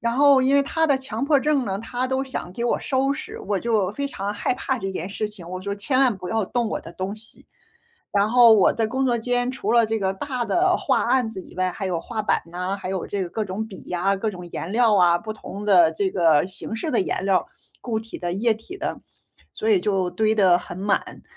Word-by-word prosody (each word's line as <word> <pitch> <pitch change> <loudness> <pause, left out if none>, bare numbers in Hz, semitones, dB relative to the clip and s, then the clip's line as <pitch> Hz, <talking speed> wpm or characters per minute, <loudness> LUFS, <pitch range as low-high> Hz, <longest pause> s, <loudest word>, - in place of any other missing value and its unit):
然 235 +1 0
后 280 -1 +6
因 270 +2 +3
为 280 - +5
他 320 +3 +1
的 280 -3 +3
强 265 +1 -3
迫 285 -2 +3
症 290 -3 +1
呢， 195 -1 -2
他 245 +3 -3
都 265 +1 -1
想 260 -8 -5
给 235 - -5
我 240 - +1
收 270 +1 0
拾， - - -7
我 200 0 -1
就 210 -4 +1
非 280 +5 -3
常 205 -5 -4
害 - - 0
怕 260 -1 -2
这 195 -2 -3
件 180 0 -4
事 210 +2 -3
情， 185 -5 -11
我 185 +1 -6
说： 200 - -3
“千 255 +6 -1
万 260 -4 +4
不 180 -1 -7
要 225 -2 0
动 235 +3 -1
我 - - -2
的 170 - -11
东 190 +4 -4
西。” 220 +1 -11 0.7
然 200 +1 +3
后 240 -1 +7
我 195 - +5
的 225 - 0
工 265 +3 0
作 240 - +2
间 245 +1 0
除 235 -4 -2
了 235 -1 +5
这 225 0 -1
个 190 -1 0
大 250 +4 -3
的 365 +7 +2
画 - - +1
案 250 -4 +2
子 190 -4 -7
以 180 - -14
外， 185 0 +1
还 195 +2 -5
有 180 -3 -1
画 225 +2 -4
板 210 - +1
呐， 180 +3 -3
还 190 -1 -6
有 190 -2 -3
这 200 -1 -2
个 175 - -5
各 215 +3 -3
种 200 +4 -4
笔 195 -4 -11
呀、 180 +3 0
各 215 +3 -2
种 180 -3 -9
颜 170 - -5
料 230 -1 +4
啊， 175 -2 +5
不 215 +5 -6
同 205 -1 -8
的 180 -6 +6
这 190 +3 -1
个 165 -3 +3
形 205 +4 -6
式 310 +7 -3
的 235 - +2
颜 190 - -2
料， 195 -2 +2 0.3
固 225 -3 -2
体 225 +1 -8
的、 175 0 -3
液 225 +4 +2
体 225 - -9
的， - - -4 0.6
所 220 - -1
以 195 - +4
就 190 -3 0
堆 215 +4 +1
得 185 -4 +5
很 175 0 -9
满。 200 +1 -1
215 Hz, 270 characters per minute, -23 LUFS, 190-245 Hz, 0.7 s, 后